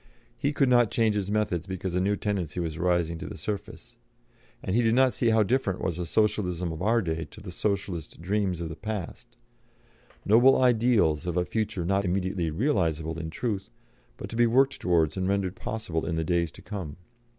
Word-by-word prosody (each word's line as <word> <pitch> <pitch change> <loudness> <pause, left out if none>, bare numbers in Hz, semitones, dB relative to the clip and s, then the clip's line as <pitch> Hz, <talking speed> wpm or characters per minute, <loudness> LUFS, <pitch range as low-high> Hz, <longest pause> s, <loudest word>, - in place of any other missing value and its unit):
He 140 - 0
could 145 -2 +2
not 120 -3 +4
change 110 -2 +2
his 100 -2 -2
methods 105 -5 -1
because 95 -1 -4
a 90 - +1
new 100 +2 +1
tendency 95 -6 -2
was 85 -1 -3
rising 85 -2 +1
to - - -6
the - - -7
surface, 110 +3 -6 0.7
and 95 - -1
he 120 - +4
did 115 0 +3
not 130 0 +4
see 120 - +1
how 110 -1 +4
different 105 -4 0
was 85 -3 -2
the 90 -1 -3
Socialism 90 -4 0
of 80 - -6
our 115 +3 +2
day 80 -1 -2
to 105 - -14
the 95 -3 -8
Socialist 95 -4 -3
dreams 95 -1 -1
of 85 - -4
the 80 - -6
past 110 +6 -6 0.9
noble 120 +6 +6
ideals 115 - +3
of 90 0 -1
a 90 - +2
future 110 -5 -2
not 100 +2 +1
immediately 95 -2 -1
realisable 80 - 0
in 80 -1 -4
truth, 100 +3 -3 0.5
but - - -6
to - - -5
be 120 0 +4
worked 135 +4 +3
towards 85 -4 +2
and 95 0 0
rendered 100 -2 0
possible 95 -7 -3
in 85 - -1
the 80 - 0
days 85 0 +1
to 95 - -14
come. 95 -9 -6
95 Hz, 200 wpm, -27 LUFS, 85-110 Hz, 0.9 s, noble